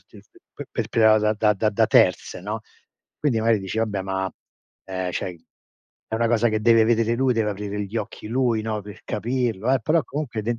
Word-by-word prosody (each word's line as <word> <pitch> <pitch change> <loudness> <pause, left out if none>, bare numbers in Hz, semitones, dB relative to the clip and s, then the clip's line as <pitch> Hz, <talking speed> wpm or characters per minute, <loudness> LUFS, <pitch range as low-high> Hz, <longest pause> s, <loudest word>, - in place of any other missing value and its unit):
p - - -17 0.3
p 145 - -7
perpetrata 110 -1 +3
da 105 0 +2
da 105 0 +2
da 105 +2 +1
da 100 - +2
terze, - - +3
no, 105 +4 -4 0.6
quindi 130 -7 +1
magari 115 0 +3
dici 95 +3 -4
vabbè, 105 -3 -1
ma, 95 -1 -2 0.5
ehm, 95 -1 -3
cioè 90 +1 -4 0.7
è 110 - -1
una 115 +1 +1
cosa 120 0 +3
che 110 -1 -1
deve 115 0 +5
vedere 115 0 +2
lui, 130 +1 +2
deve 110 -2 0
aprire 105 0 -4
gli 100 +4 -6
occhi 110 0 -5
lui, 120 -2 +1
no, 110 -1 -3
per 105 +1 -11
capirlo 120 -1 -1
eh, 135 - +4
però 155 +7 +2
comunque 125 -6 -4
den 120 +2 -2
110 Hz, 200 wpm, -23 LUFS, 105-120 Hz, 0.7 s, deve